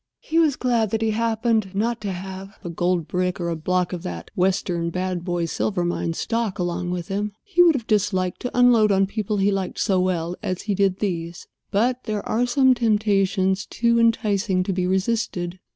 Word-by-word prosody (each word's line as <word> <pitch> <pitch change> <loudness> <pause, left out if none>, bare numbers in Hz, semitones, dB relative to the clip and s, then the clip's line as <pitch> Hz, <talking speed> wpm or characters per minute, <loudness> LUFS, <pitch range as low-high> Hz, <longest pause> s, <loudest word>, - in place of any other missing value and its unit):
He 325 +1 0
was 310 -5 +3
glad 235 -5 +1
that 225 +2 -1
he 220 - +1
happened 220 -2 0
not 230 +2 -1
to 205 -2 -3
have 190 +2 -7
a 175 - -5
gold 175 -1 0
brick 180 0 -1
or 170 -1 -2
a 165 - -1
block 180 +3 -1
of 175 - -4
that 85 - -7
western 180 -2 0
Bad 180 0 -3
Boy 175 -2 -1
Silver 175 +2 -1
Mine 175 -1 -1
stock 230 +2 -2
along 175 0 -2
with 175 -1 -4
him. 205 +1 -2
He 375 -4 +2
would 340 -3 +6
have 240 -5 -3
disliked 195 -4 0
to 250 - -5
unload 235 -4 +5
on 195 0 +3
people 210 +1 -2
he 200 +1 +2
liked 195 -2 -3
so 190 -2 +2
well 175 -2 -1
as 185 -1 -3
he 205 - -1
did 195 -1 +1
these; 170 -4 -3 0.2
but 245 +5 0
there 215 -2 -3
are 240 +3 +1
some 260 +1 +4
temptations 200 -4 +1
toe 235 0 +1
enticing 210 -4 +2
to 195 - -2
be 180 0 0
resisted. 185 -2 -1
195 Hz, 200 wpm, -23 LUFS, 180-225 Hz, 0.2 s, would